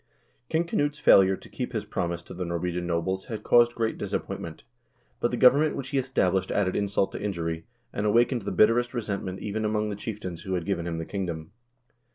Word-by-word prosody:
King 160 +1 +2
Knut's 145 -3 0
failure 95 -8 +6
to - - -14
keep - - -5
his - - -2
promise 85 -1 -3
to - - -10
the 90 - -4
Norwegian 85 0 -2
nobles 90 +3 -1
had 110 -2 -6
caused 120 0 +5
great 115 -1 -1
disappointment, 80 -2 -4 0.6
but 120 - +1
the 120 - -2
government 145 +5 +5
which 130 -1 -5
he 140 -2 +1
established 95 -8 +1
added 95 -2 +1
insult 100 -1 +1
to - - -6
injury, 85 -5 -3 0.3
and 100 - -2
awakened 120 +3 +3
the 100 - -4
bitterest 120 +3 +3
resentment 100 -5 -3
even 110 +1 -3
among 105 0 0
the 105 - -3
chieftains 100 -5 -6
who 95 -1 -2
had 85 -2 -2
given 85 -4 -1
him 85 -1 -3
the 80 - -4
kingdom. 85 -5 -4
100 Hz, 200 wpm, -27 LUFS, 90-120 Hz, 0.6 s, failure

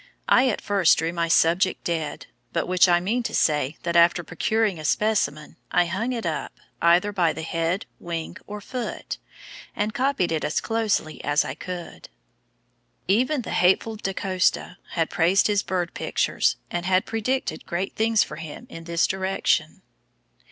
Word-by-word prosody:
I 255 0 +5
at 220 - -2
first 195 -5 +3
drew 165 +2 -1
my 170 -1 0
subject 170 +3 +3
dead, 165 -3 -3 0.3
by 165 - +1
which 180 0 +4
I 175 0 +5
mean 215 +8 0
to 235 - -3
say 150 -1 +1
that 170 0 -2
after 170 +1 +5
procuring 215 +2 0
a - - -7
specimen, 155 -5 0
I 175 - +3
hung 195 +8 -2
it 235 -5 -3
up, 160 -2 -3 0.3
either 175 +4 +4
by 175 -6 +1
the 160 +1 -6
head, 165 +4 -1
wing, 170 +1 -5
or 210 0 -7
foot, 245 +3 -5 0.6
and 210 +1 -1
copied 260 -9 0
it 160 -2 -1
as 150 - 0
closely 220 -8 -1
as 145 +1 +2
I - - -4
could." 180 -2 -8 1.0
Even 250 +8 +2
the - - -6
hateful 190 +5 +2
Da 195 -2 -3
Costa 185 -1 0
had 165 -2 0
praised 185 +1 +3
his 205 -1 +2
bird 180 -2 -2
pictures - - 0 0.2
and 175 0 -2
had 185 0 +3
predicted 255 +4 -2
great 185 +3 -3
things 220 -1 +3
for - - -8
him 160 +8 -8
in 165 0 -9
this 170 -1 +1
direction. 190 0 0
180 Hz, 165 wpm, -24 LUFS, 170-210 Hz, 1.0 s, I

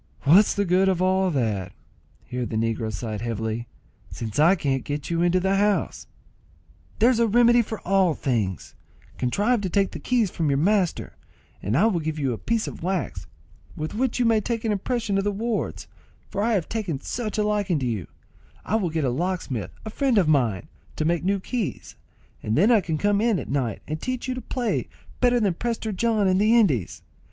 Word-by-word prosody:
"What's 180 +9 +5
the 200 - +1
good 185 +2 +3
of 185 -2 +1
all 185 +1 +2
that," 110 - -1 0.5
(here 125 0 -4
the - - -5
negro 115 0 -1
sighed 110 0 -5
heavily,) 115 0 -3 0.4
"since 110 +2 -5
I 170 +5 +6
can't 135 -6 -1
get 145 +2 -4
you 170 0 +1
into 175 +1 +3
the 190 +2 +1
house?" 205 0 0 0.9
"There's 235 +1 +4
a 235 - +4
remedy 240 +2 +5
for 220 -1 -5
all 190 -4 +2
things: 105 - -2 0.5
contrive 205 - +1
to 190 - -2
take 195 +1 +1
the - - -7
keys 235 -7 +1
from 160 -3 -1
your 140 - +2
master, 185 +3 +1 0.5
and 105 +6 0
I 195 - +4
will 205 -6 +2
give 155 0 -3
you 135 -4 0
a 110 - -6
piece 230 -1 -1
of - - -7
wax, 185 +1 -3 0.5
with 155 +1 -4
which 250 +2 0
you 250 - +2
may 225 -2 +3
take 230 +1 -3
an 220 - +1
impression 210 0 -1
of - - -1
the 205 - 0
wards, 220 +2 -3 0.4
for 200 - -3
I 230 +2 +2
have 185 -6 0
taken 200 -11 -3
such 220 - -4
a 210 - +2
liking 205 -5 0
to 135 - -2
you, 110 -8 -2 0.6
I 220 - +1
will 190 -6 -1
get 160 -2 -1
a 125 - +1
locksmith, 145 - -2 0.2
a 220 - -5
friend 265 -1 +1
of 185 -5 +4
mine, 130 -6 +1 0.3
to 155 - -1
make 170 +1 +1
new 195 +2 +1
keys, 230 +2 -4 0.5
and 110 +3 -1
then 205 +9 +5
I 225 -3 +5
can 165 -3 -2
come 205 +3 +2
in 225 -3 +2
at - - -6
night 130 -6 -2
and 155 +1 -4
teach 255 0 -3
you 255 - -1
to 255 - -5
play 245 -2 -2 0.3
better 245 -1 +3
than 200 -5 +1
Prester 225 +3 -3
John 215 0 +1
in 185 0 +3
the 215 +3 +4
Indies. 135 - +1
190 Hz, 205 wpm, -24 LUFS, 140-220 Hz, 0.9 s, I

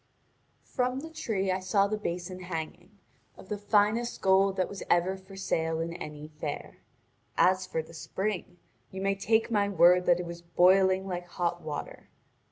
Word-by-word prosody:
From 255 +1 -1
the 320 +1 -8
tree 195 -11 -1
I 185 - 0
saw 190 +2 +2
the 210 +1 -1
basin 180 -2 -4
hanging, 175 +2 -6 0.4
of - - -14
the 210 - -2
finest 210 +3 +2
gold 190 0 +3
that 185 - +1
was 200 - -8
ever 175 +2 +3
for 190 +1 -13
sale 160 -4 -1
in 165 +1 -3
any 150 -3 -7
fair. 145 -2 -5 0.6
As 185 0 +3
for 160 -3 -2
the 165 - -15
spring, 185 +2 -4 0.3
you 190 - -7
may 195 +1 +1
take 220 +4 +1
my 205 -2 +2
word 180 -2 +5
that 175 0 +5
it 180 - -3
was 170 0 -7
boiling 185 +2 +4
like 175 -1 -4
hot 175 0 -2
water. 155 -1 -7
185 Hz, 175 wpm, -29 LUFS, 175-200 Hz, 0.6 s, word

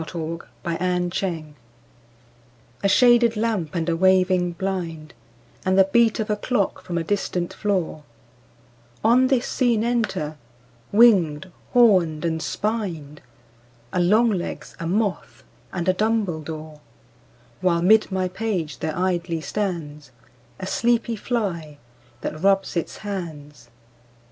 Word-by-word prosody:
AN - - -5
AUGUST 165 +1 -5 0.2
MIDNIGHT 180 +1 -1
I 170 -4 -2 1.4
A 200 - +3
SHADED 240 0 +5
lamp 210 -9 -1
and 165 -1 -1
a 170 - +1
waving 185 0 +3
blind, 170 -5 -4 0.5
And 185 0 +1
the 195 - +8
beat 230 0 +4
of 215 -1 -1
a - - +2
clock 210 -1 -1
from 175 - -4
a 165 - 0
distant 180 -1 -2
floor: 190 -7 -1 1.0
On 245 +4 +5
this 255 -2 +1
scene 235 -4 +1
enter—winged, 155 - +1 0.2
horned, 185 -10 +4
and 160 -1 -1
spined— 170 -6 -3 0.7
A - - +1
longlegs, 205 +1 +1
a 165 - -3
moth, 200 +1 -2 0.3
and 175 -1 -3
a 185 - +4
dumbledore; 160 -8 -2 0.8
While 170 -2 +1
'mid 215 +2 +5
my 185 -1 0
page 180 -6 -3
there 155 +1 -3
idly 175 -2 -1
stands 155 -5 -4 0.5
A 185 - -5
sleepy 235 +3 +1
fly, 185 -10 -3 0.4
that 155 - -5
rubs 195 0 +2
its 170 - -3
hands 150 - -7
185 Hz, 120 wpm, -23 LUFS, 160-210 Hz, 1.4 s, the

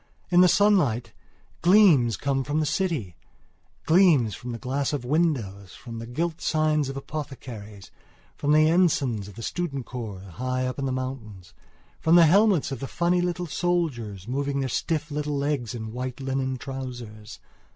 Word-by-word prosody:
In 175 0 +6
the 180 - +7
sunlight 170 - +2 0.5
gleams 170 - +5
come 135 +1 -1
from 145 +3 -1
the 155 - +1
citygleams 150 - 0
from 120 +7 -7
the 115 - -4
glass 135 +4 -2
of 135 -4 -3
windows; 120 - -1
from 115 -2 -8
the 115 - -7
gilt 160 +6 -3
signs 155 -3 +1
of 135 - -5
apothecaries; 125 -9 -8 0.4
from 145 - -1
the 155 +1 +5
ensigns 145 - +2
of 105 - -12
the 115 - -8
student 140 -6 -3
corps 110 -7 -6
high 125 +7 -3
up 130 +1 -4
in 135 - -1
the 130 - -1
mountains; 125 -8 -6 0.5
from 165 +1 +4
the 170 -1 +8
helmets 190 -3 +4
of 135 - -4
the 135 - -5
funny 175 +3 +1
little 175 0 -2
soldiers 140 - -2
moving 140 +2 -1
their 135 - -2
stiff 160 +4 -2
little 150 0 -2
legs 140 -5 -2
in 110 -1 -6
white 125 +1 -5
linen 130 -1 -2
trousers. 120 -5 -8
135 Hz, 160 wpm, -25 LUFS, 120-160 Hz, 0.5 s, the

